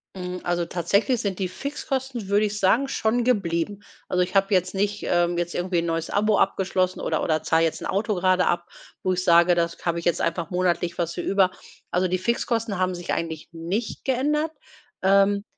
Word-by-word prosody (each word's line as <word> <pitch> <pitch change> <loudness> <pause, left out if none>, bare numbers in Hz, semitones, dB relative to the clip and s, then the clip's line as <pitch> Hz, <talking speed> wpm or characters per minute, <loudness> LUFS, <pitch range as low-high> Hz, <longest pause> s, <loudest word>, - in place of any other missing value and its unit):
Mhm. 180 -1 -5
Also 175 0 0
tatsächlich 200 - +1
sind 195 -2 -3
die 185 -2 -1
Fixkosten, 265 -2 -4
würde 205 +1 +3
ich 210 0 -3
sagen, 225 +8 +3
schon 240 -2 0
geblieben. 200 -3 0 0.2
Also 180 0 +2
ich 180 +1 -6
habe 195 +1 +3
jetzt 185 -1 +2
nicht, 205 +1 -1
ähm, 175 0 +2
jetzt 175 0 -2
irgendwie 180 0 0
'n 170 - -2
neues 165 -1 -2
Abo 210 0 +2
abgeschlossen 185 -1 +1
oder - - -1
oder 155 -1 0
zahle 165 0 +3
jetzt 160 - -2
'n - - -5
Auto 210 +2 0
gerade 185 0 +2
ab, 175 0 -1 0.3
wo 185 - +1
ich 180 0 0
sage, 170 +1 +6
das 170 -1 0
habe 170 -1 0
ich 170 - -9
jetzt 175 - +1
einfach 170 +1 -1
monatlich 175 -1 0
was 170 -1 -1
für - - -3
über. 190 -2 +2 0.4
Also 185 +1 +2
die 185 +1 0
Fixkosten 225 0 -1
haben 185 0 +1
sich 175 0 -5
eigentlich 160 -2 -4
nicht 175 +7 -4
geändert. 300 +4 +1 0.5
Ähm, 200 +1 +4
185 Hz, 200 wpm, -24 LUFS, 175-205 Hz, 0.5 s, sage